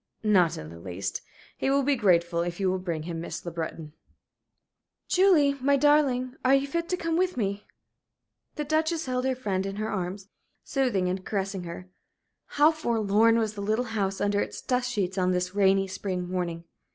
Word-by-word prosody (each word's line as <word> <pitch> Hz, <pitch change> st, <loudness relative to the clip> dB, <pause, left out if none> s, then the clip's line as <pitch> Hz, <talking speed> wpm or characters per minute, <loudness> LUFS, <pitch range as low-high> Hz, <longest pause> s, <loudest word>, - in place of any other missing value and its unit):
"Not 185 Hz, -6 st, +3 dB
in 80 Hz, -, -8 dB
the 85 Hz, 0 st, -11 dB
least. 90 Hz, +2 st, -4 dB, 0.3 s
He -, -, -1 dB
will 275 Hz, 0 st, +3 dB
be 285 Hz, +1 st, +2 dB
grateful 170 Hz, -6 st, +2 dB
if 175 Hz, +1 st, -4 dB
you 190 Hz, -2 st, +2 dB
will 185 Hz, -, -1 dB
bring 170 Hz, -4 st, -3 dB
him 165 Hz, 0 st, -5 dB
Miss 170 Hz, -, -6 dB
Le 170 Hz, -, -4 dB
Breton." 160 Hz, -2 st, -6 dB, 1.1 s
"Julie, 350 Hz, -7 st, +4 dB
my 280 Hz, +1 st, +3 dB
darling, 270 Hz, -3 st, +3 dB
are 260 Hz, +2 st, +5 dB
you 275 Hz, 0 st, +1 dB
fit 335 Hz, +4 st, -3 dB
to 360 Hz, -, 0 dB
come 330 Hz, -2 st, -1 dB
with 365 Hz, -2 st, 0 dB
me?" 200 Hz, -2 st, -2 dB, 0.9 s
The 300 Hz, -, -2 dB
Duchess 315 Hz, +2 st, 0 dB
held 255 Hz, 0 st, -1 dB
her 260 Hz, -1 st, +1 dB
friend 200 Hz, -7 st, -2 dB
in 195 Hz, 0 st, -4 dB
her 215 Hz, +1 st, -3 dB
arms, 190 Hz, 0 st, -4 dB, 0.4 s
soothing 245 Hz, -10 st, 0 dB
and 185 Hz, +1 st, -2 dB
caressing 195 Hz, -2 st, -3 dB
her. 170 Hz, +2 st, -8 dB, 0.6 s
How 295 Hz, +2 st, +4 dB
forlorn 230 Hz, -6 st, +2 dB
was 220 Hz, -2 st, 0 dB
the 205 Hz, -, -6 dB
little 220 Hz, +5 st, 0 dB
house, 195 Hz, -2 st, -1 dB
under 205 Hz, 0 st, +1 dB
its -, -, -4 dB
dust 250 Hz, -1 st, -1 dB
sheets, 195 Hz, -5 st, -1 dB
on 185 Hz, 0 st, +2 dB
this 180 Hz, 0 st, -1 dB
rainy, 195 Hz, -1 st, +3 dB
spring 185 Hz, -1 st, -4 dB
morning! 175 Hz, -2 st, -3 dB
205 Hz, 190 wpm, -27 LUFS, 180-265 Hz, 1.1 s, are